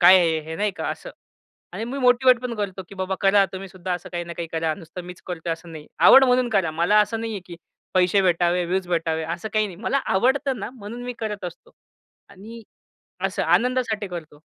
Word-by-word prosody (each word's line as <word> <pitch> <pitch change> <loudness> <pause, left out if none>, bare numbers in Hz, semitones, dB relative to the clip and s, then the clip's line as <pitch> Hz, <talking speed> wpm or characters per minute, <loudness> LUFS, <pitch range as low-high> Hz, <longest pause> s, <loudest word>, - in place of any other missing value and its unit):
काय 180 +2 +9
आहे 165 -3 +2
हे, 160 +1 -7
नाही 210 +2 +1
का - - -3
असं. - - -6 0.6
आणि 225 - -4
मी 255 +4 -5
मोटिव्हेटपण 250 -1 +4
करतो, 200 -3 -4
कि - - -11
बाबा 190 0 -2
करा 195 0 +5
तुम्ही 190 +1 -6
सुद्धा 185 0 -5
असं 175 - -7
काही 175 0 -3
ना 170 - -7
काही 170 -1 -4
करा. 160 -1 0
नुसतं 175 +1 -9
मीच 180 0 -10
करत 180 -2 -5
आहे 165 - +1
असं 165 0 -9
नाही. 155 -1 -9
आवड 270 - +8
म्हणून 250 -1 +3
करा. 195 -8 +1
मला 170 +7 +3
असं 215 +2 0
नाही 225 0 -3
आहे, 205 - -4
की 175 - -9 0.4
पैसे 185 +2 +4
भेटावे, 175 0 +2
व्यूज 185 +1 -1
भेटावे 165 -2 0
असं 170 +6 -4
काही 215 -1 +2
नाही. 185 -4 -9
मला 275 - +1 0.2
आवडतं 260 +5 +2
ना, 210 - -5
म्हणून 235 -1 -9
मी 250 - -4
करत 210 -3 -4
असतो 175 -1 -9 0.6
आणि 215 +4 -11 0.6
असं 195 -2 0
आनंदासाठी 225 +4 +1
करतो. 160 -4 -8
190 Hz, 215 wpm, -23 LUFS, 175-225 Hz, 0.6 s, काय